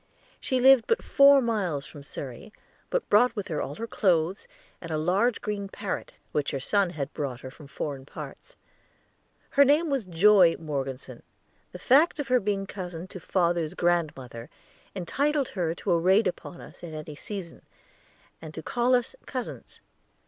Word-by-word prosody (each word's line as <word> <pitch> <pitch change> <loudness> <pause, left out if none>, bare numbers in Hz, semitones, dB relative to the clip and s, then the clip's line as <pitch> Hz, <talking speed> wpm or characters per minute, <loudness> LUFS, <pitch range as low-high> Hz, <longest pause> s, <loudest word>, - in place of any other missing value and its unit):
She 260 - 0
lived 260 -2 +6
but 460 - +1
four 280 -1 +6
miles 185 -11 -1
from 145 +1 -11
Surrey, 140 - -8 0.4
but - - -1
brought 245 +5 +4
with 205 -4 -4
her 155 -3 -2
all 145 - -4
her 230 - -4
clothes, 185 - +1 0.3
and 165 - -8
a 155 - -1
large 190 +9 +1
green 200 -2 -3
parrot, 200 0 -5 0.2
which 145 -1 0
her 135 - -3
son 195 +7 +2
had 150 -5 -5
brought 135 -4 -4
from 150 -2 -13
foreign 140 -1 -5
parts. - - -10 1.0
Her 280 - +6
name 295 +3 +3
was 260 -8 -1
Joy 180 0 +5
Morgeson; 135 -4 -5 0.5
the - - -8
fact 295 +7 +4
of 285 - -3
her 250 0 +4
being 200 -1 -1
cousin 180 -3 -7
to 185 - -8
father's 170 -2 0
grandmother 145 -9 -1 0.5
entitled 275 - 0
her 170 -4 -2
to 190 - -3
a 170 - +4
raid 190 +6 +4
upon 175 0 -4
us - - -14
at 165 -2 -7
any 155 0 -7
season, 180 +2 -8 0.8
and 155 -1 -9
to 160 - -6
call 245 +6 +2
us 245 -1 -1
"cousins." 255 -2 -6
185 Hz, 165 wpm, -27 LUFS, 155-235 Hz, 1.0 s, lived